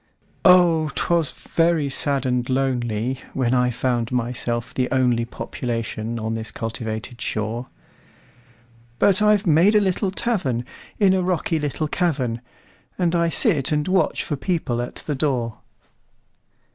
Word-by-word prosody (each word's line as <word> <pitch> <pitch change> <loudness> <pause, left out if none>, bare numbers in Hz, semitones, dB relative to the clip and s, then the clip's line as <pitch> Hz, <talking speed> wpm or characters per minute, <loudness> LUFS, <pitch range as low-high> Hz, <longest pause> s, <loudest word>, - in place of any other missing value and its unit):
Oh! 175 -4 +5
'twas 170 -3 +1
very 165 -3 +1
sad 140 0 0
and 125 -1 +1
lonelyWhen 130 -1 -1
I 125 -1 +3
found 120 -1 -1
myself 120 0 -2
the 125 -1 0
onlyPopulation 120 -2 -2
on 110 0 -2
this 110 0 -4
cultivated 115 +1 -5
shore; 110 +3 -3 1.3
But 195 +8 +3
I've 210 -1 +4
made 175 +6 +5
a - - +7
little 195 0 0
tavernIn 180 - -1 0.5
a 190 - +2
rocky 175 -2 0
little 150 +1 -2
cavern, 135 -9 -1 0.6
And 175 -2 +1
I 170 -1 +2
sit 165 - +1
and 150 -1 0
watch 185 -3 +1
for 150 - -2
people 140 -6 -1
at 120 - -6
the 150 - -4
door. 130 -5 -1
135 Hz, 125 wpm, -22 LUFS, 120-170 Hz, 1.3 s, a